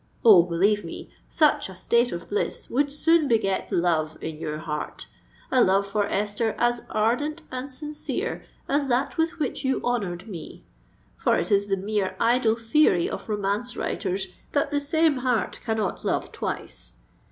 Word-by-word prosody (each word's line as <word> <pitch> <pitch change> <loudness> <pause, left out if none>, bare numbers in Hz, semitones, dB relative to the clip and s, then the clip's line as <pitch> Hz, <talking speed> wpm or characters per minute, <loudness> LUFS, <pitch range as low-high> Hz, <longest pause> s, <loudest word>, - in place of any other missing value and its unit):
Oh! 205 -6 +9
believe 190 +5 +1
me, 165 - -8 0.2
such 300 -9 +3
a 190 - -10
state 235 +6 +2
of 170 - -6
bliss 205 - -2
would 280 +3 +1
soon 315 +1 +3
beget 215 -6 +1
love 160 -3 +1
in 160 -1 -6
your 150 -1 -3
heart,—a 160 +10 -3
love 195 +1 +3
for 200 0 0
Esther 210 +3 -1
as 240 0 +1
ardent 290 +9 0
and 255 +2 -5
sincere 300 +3 -4 0.2
as 280 0 +1
that 265 +7 0
with 325 +1 +1
which 295 -6 -2
you 265 0 +1
honoured 200 -7 -2
me; 180 -7 -9 0.5
for - - +2
it 175 - -1
is 200 0 +3
the 195 -1 +1
mere 200 0 -1
idle 235 -1 +3
theory 230 - +3
of - - -6
romance 210 +4 -1
writers, 190 -1 -2 0.3
that 285 0 +1
the 290 - +1
same 310 0 +2
heart 250 -3 0
cannot 220 -4 -2
love - - -1
twice. - - -5
220 Hz, 160 wpm, -25 LUFS, 195-270 Hz, 0.5 s, Oh